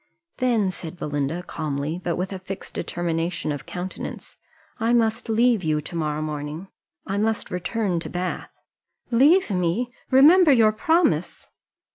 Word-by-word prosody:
"Then," 230 -7 +1
said 175 -1 -8
Belinda, 145 +2 -2
calmly, 155 0 -3
but 175 -1 -1
with 185 +2 -3
a 190 - -5
fixed 190 +1 -7
determination 170 -1 -2
of 145 - -6
countenance, 180 +1 -7 0.4
"I 230 +2 +2
must 225 0 +1
leave 230 -2 +3
you 155 -1 +1
to 155 +3 -8
morrow 155 -2 -1
morning 150 +4 -5 0.4
I 195 +1 -2
must 220 0 -1
return 180 0 -1
to - - -5
Bath." 180 +1 -4 0.5
"Leave 285 - +5
me! 185 +7 0 0.2
remember 305 +5 +7
your 225 -5 +5
promise." 325 +11 +1
185 Hz, 140 wpm, -24 LUFS, 165-230 Hz, 0.5 s, remember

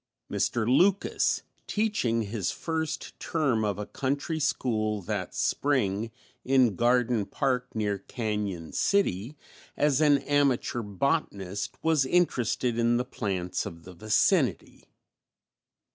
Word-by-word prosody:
Mr. 115 -2 0
Lucas, 180 +10 +2 0.2
teaching 205 - 0
his 100 -3 -2
first 160 -2 -3
term 135 -9 0
of 105 -3 -1
a 105 - -4
country 140 +7 -2
school 110 -7 0
that 90 - -4
spring 115 -7 0 0.3
in 130 -5 +3
Garden 120 0 +2
Park 125 -3 -1
near 105 -2 -1
Cañon 105 -6 -4
City, 145 - +1 0.4
as 145 -1 +2
an 145 -2 +5
amateur 140 -4 +1
botanist 100 - -2
was 160 -4 +3
interested 125 -7 +1
in 120 0 +3
the 125 - -1
plants 95 -5 -3
of 85 0 -10
the 90 - -11
vicinity. 105 +5 +1
120 Hz, 115 wpm, -28 LUFS, 105-145 Hz, 0.4 s, an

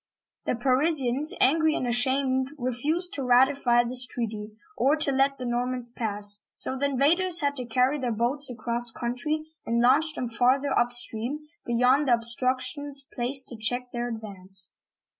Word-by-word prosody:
Tfie 235 - -1
Parisians, 270 +2 +2
angry 315 +3 +3
and 255 - -2
ashamed, 260 +2 +1
refused 300 +9 -1
to 280 - -3
ratify 250 -1 +3
this 250 +1 +3
treaty 220 -4 -5 0.3
or 275 +4 +2
to 300 -2 0
let 275 +1 +1
the 255 - -6
Normans 245 0 -2
pass, 205 -3 0 0.2
so 260 - 0
the 280 +2 0
invaders 335 +6 +2
had 285 -1 0
to 250 - -4
carry 255 +5 +1
their 250 -3 -2
boats 250 +6 0
across 240 0 -2
country, 250 +7 -3 0.2
and 235 +1 -1
launch 290 +6 +3
them 250 - -3
farther 255 +4 +1
upstream, 240 +3 -1 0.3
beyond 250 +4 +2
the 245 - +5
obstructions 260 +4 -1
placed 260 +2 0
to 240 - -8
check 245 +3 -1
their 240 0 -3
advance. 195 -4 -2
255 Hz, 155 wpm, -26 LUFS, 240-280 Hz, 0.3 s, the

